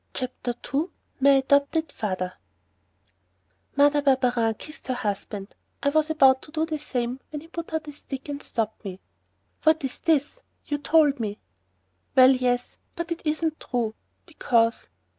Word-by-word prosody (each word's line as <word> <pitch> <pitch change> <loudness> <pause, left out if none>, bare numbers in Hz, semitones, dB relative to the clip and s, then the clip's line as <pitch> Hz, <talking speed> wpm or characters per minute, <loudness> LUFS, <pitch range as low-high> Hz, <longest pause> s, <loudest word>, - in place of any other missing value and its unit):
CHAPTER 255 -1 -3 0.2
II 290 +4 +2 0.3
MY 275 +1 +5
ADOPTED 280 +3 +3
FATHER 185 -3 -3 1.4
Mother 290 +1 +5
Barberin 250 -5 +2
kissed 305 +7 -10
her 255 - 0
husband; 205 -3 -4 0.3
I 285 - +4
was 310 +1 +2
about 265 -4 +5
to 300 - -12
do 315 0 0
the 310 -2 -3
same 250 -3 -2
when 300 -1 -6
he 325 - -14
put 335 0 -6
out 320 -1 -2
his 295 -1 -9
stick 270 -1 -7
and 285 0 -5
stopped 225 -4 -3
me. 190 -2 -6 0.6
"What's 315 -5 +2
this?... 315 - +1 0.2
you 290 -1 -2
told 290 -2 +4
me...." 210 -2 -3 0.8
"Well, 260 0 +8
yes, 250 -1 0 0.2
but 340 0 -4
it 335 - -2
isn't 310 +1 0
true... 235 -4 -2 0.3
because...." 230 - +1
275 Hz, 150 wpm, -25 LUFS, 245-305 Hz, 1.4 s, Well